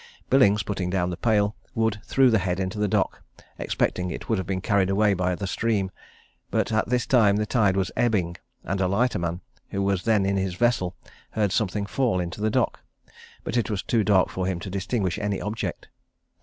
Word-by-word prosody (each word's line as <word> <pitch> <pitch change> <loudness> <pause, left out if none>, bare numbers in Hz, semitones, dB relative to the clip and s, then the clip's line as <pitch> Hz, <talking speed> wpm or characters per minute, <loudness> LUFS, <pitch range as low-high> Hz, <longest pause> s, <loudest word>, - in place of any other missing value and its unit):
Billings 105 -6 +5
putting 95 -3 -3
down 90 -1 0
the - - -3
pail, 105 0 +1 0.2
Wood 110 -2 0
threw 135 -2 +4
the 110 - +4
head 90 -1 -1
into 95 +2 -3
the 105 - +2
dock, - - 0 0.4
expecting 90 0 -1
it 80 - -6
would 110 -4 +1
have 95 - -4
been 95 -1 -1
carried 100 -1 +1
away 105 +1 +3
by 90 -1 0
the 100 - -4
stream; 100 -1 0 0.6
but - - 0
at 110 0 +1
this 125 0 +1
time 115 -8 +4
the 105 +1 0
tide 105 -4 +2
was 95 - 0
ebbing, 100 -8 +1 0.3
and 95 +1 -2
a 95 - +2
lighterman, 90 -5 0 0.3
who 100 - -2
was 100 -2 +1
then 105 -2 +2
in 100 0 +1
his 95 -2 -1
vessel, 105 -5 +1 0.3
heard 105 -3 0
something 100 0 0
fall 115 -3 0
into 90 +3 -4
the 110 - +2
dock, - - 0 0.6
but - - -4
it 120 -2 +1
was 105 -3 -2
too 115 -3 +1
dark 95 -1 +3
for 95 -1 -2
him 95 -3 -2
to 95 - -6
distinguish 95 -1 -1
any 105 -1 -1
object. 105 +2 -4
100 Hz, 205 wpm, -25 LUFS, 95-110 Hz, 0.6 s, Billings